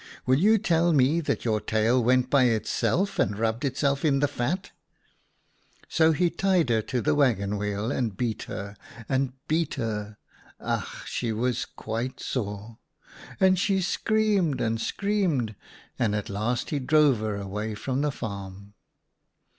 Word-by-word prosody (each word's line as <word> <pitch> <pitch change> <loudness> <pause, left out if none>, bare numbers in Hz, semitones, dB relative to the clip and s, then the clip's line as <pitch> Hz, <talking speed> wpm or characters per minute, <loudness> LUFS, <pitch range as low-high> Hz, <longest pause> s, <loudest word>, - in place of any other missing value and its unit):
' - - -20
Will 130 +2 +3
you 215 +5 +5
tell 170 -3 +2
me 145 +3 +3
that 150 - -2
your 110 -2 +1
tail 115 +3 +2
went 125 +1 +2
by 140 -3 +5
itself 145 - 0
and 100 +1 +1
rubbed 115 +1 -1
itself 140 0 0
in 145 -3 +3
the 145 - +3
fat? 145 +8 -3 0.4
' - - -42
" - - -39 0.3
So 160 0 +4
he 170 +2 +1
tied 180 -5 +1
her 110 -1 +3
to 125 +3 -2
the - - +2
waggon 110 -9 +2
wheel 105 +2 -2
and 110 -6 -2
beat 115 -3 -2
her, 100 +1 -6 0.3
and 135 -1 0
beat 160 +1 0
her 105 -4 -4 0.2
— - - -27
ach! - - -3
she 120 -2 -2
was 120 +2 -1
quite 115 +4 -5
sore 105 -2 -4 0.3
— - - -17
and 185 -1 +4
she 195 0 +2
screamed 200 - +1
and 115 0 -1
screamed, 180 - 0 0.5
and 105 -3 +1
at 105 - -3
last 115 +4 -2
he 145 - 0
drove 145 -2 +4
her 110 -1 -2
away 105 +2 -4
from 130 +5 -2
the 150 0 +1
farm. 100 -3 -7
125 Hz, 170 wpm, -26 LUFS, 110-155 Hz, 0.5 s, you